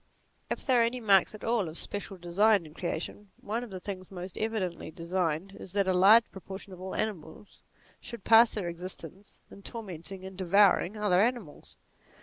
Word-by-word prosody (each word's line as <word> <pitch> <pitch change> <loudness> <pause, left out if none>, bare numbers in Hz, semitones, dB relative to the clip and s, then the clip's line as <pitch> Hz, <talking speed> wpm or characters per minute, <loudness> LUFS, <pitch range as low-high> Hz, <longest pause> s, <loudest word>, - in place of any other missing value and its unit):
If - - -4
there 255 -3 +4
are - - +5
any 235 +2 -1
marks 200 -2 +4
at 215 - -12
all 225 -7 0
of 160 - -9
special 200 -1 -3
design 190 +2 +3
in 155 - -13
creation, 175 +4 -5
one 225 +4 -3
of 245 - -8
the 190 -2 -7
things 185 -1 -7
most 185 -1 -7
evidently 215 -8 -3
designed 170 +2 -2
is 185 - -10
that 200 -1 +1
a 185 - +3
large 200 +6 +7
proportion 190 +1 -9
of 180 - -11
all 190 0 -5
animals 195 -2 -5 0.4
should 235 -4 -9
pass 230 +1 +7
their 200 -5 -4
existence 180 +2 -8
in 200 - -12
tormenting 190 -4 -7
and 190 0 -9
devouring 195 +1 +3
other 200 -3 +3
animals. 225 -9 -3
195 Hz, 180 wpm, -29 LUFS, 180-215 Hz, 0.4 s, large